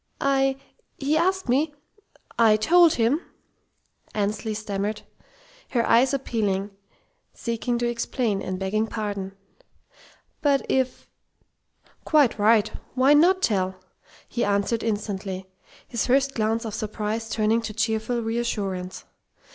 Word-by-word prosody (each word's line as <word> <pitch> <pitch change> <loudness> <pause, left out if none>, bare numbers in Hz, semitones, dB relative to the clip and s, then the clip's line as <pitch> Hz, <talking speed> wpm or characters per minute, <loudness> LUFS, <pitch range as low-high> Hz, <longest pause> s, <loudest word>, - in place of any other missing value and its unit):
"I 270 -1 +2 0.4
he 285 +2 0
asked 375 +2 +1
me... 290 +5 +1 0.6
I 220 -2 +6
told 335 +9 +5
him," 245 +8 +2 0.9
Annesley 215 +1 -1
stammered, 210 0 -3 0.7
her 235 -2 +2
eyes 250 +3 +5
appealing, 210 -7 -1 0.6
seeking 235 +1 -2
to 240 0 0
explain, 235 -3 -1
and 185 0 -3
begging 205 +4 -1
pardon. 200 -3 -4 1.1
"But 280 -2 +2
if 260 -1 -1 0.5
" - - -35
"Quite 290 -8 +3
right. 215 0 +4 0.2
Why 265 +3 +5
not 360 +5 +4
tell?" 190 -3 +1 0.5
he 240 - -2
answered 205 +3 +1
instantly, 200 -3 -3 0.4
his 235 -3 -2
first 275 +2 +3
glance 225 0 0
of 220 - -4
surprise 215 +1 -3
turning 220 +1 +1
to 225 - -5
cheerful 225 +2 -1
reassurance. 205 -5 -3
225 Hz, 115 wpm, -25 LUFS, 210-260 Hz, 1.1 s, I